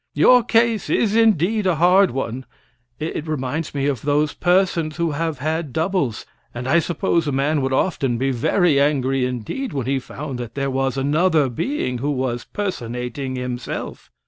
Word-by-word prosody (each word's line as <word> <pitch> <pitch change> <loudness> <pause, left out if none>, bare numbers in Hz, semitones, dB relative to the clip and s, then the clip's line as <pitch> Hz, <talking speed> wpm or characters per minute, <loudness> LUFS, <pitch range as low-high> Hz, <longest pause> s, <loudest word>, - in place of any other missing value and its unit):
"Your 250 -1 +6
case 230 -1 +2
is 220 -2 +1
indeed 215 -2 +3
a 180 - +2
hard 180 +4 +5
one. 130 0 -4 0.5
It 155 0 -4
reminds 150 +1 -3
me 140 -1 0
of 140 -6 -1
those 150 +1 +1
persons 175 -4 +1
who 170 -2 0
have 160 0 -2
had 155 +2 -2
doubles, 160 - -1 0.3
and 125 +1 -4
I 160 +6 +4
suppose 165 -1 0
a - - 0
man 140 +2 +1
would 135 0 -1
often 130 -4 0
be 135 +3 0
very 145 +5 +2
angry 135 -3 +1
indeed 125 - -4
when 135 -4 -2
he 135 +1 0
found 135 0 -7
that 120 -2 -7
there 135 -1 -1
was 135 0 -1
another 150 +1 +2
being 125 - -2
who 140 +4 -1
was 130 -3 -2
personating 130 - -4
himself." 125 -1 -5
145 Hz, 170 wpm, -21 LUFS, 130-170 Hz, 0.5 s, Your